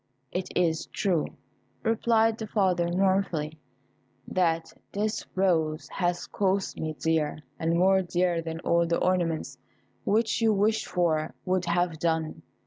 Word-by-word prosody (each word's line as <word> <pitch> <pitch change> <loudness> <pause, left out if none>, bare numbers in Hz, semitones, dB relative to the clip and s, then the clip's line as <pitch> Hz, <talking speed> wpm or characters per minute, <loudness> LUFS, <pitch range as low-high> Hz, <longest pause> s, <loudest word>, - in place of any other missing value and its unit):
"It 180 +1 -2
is 165 -3 +1
true," 180 -6 0 0.6
replied 225 0 +2
the 220 - -4
father, 180 -5 +1
mournfully, 180 -5 +1 0.7
"that 165 -3 0 0.2
this 210 +2 -2
rose 165 -5 +1
has 175 -1 -1
cost 195 -1 -1
me 155 0 -2
dear, 155 -1 0 0.2
and 165 +1 +1
more 190 +2 +4
dear 175 -1 0
than 165 0 -5
all 170 -1 +2
the 170 - +1
ornaments 175 -3 0 0.4
which 220 +2 +1
you 220 -1 +4
wished 215 +2 +1
for 160 -3 0
would 185 -1 +1
have 170 -1 0
done. 160 -1 -1
175 Hz, 135 wpm, -27 LUFS, 165-195 Hz, 0.7 s, more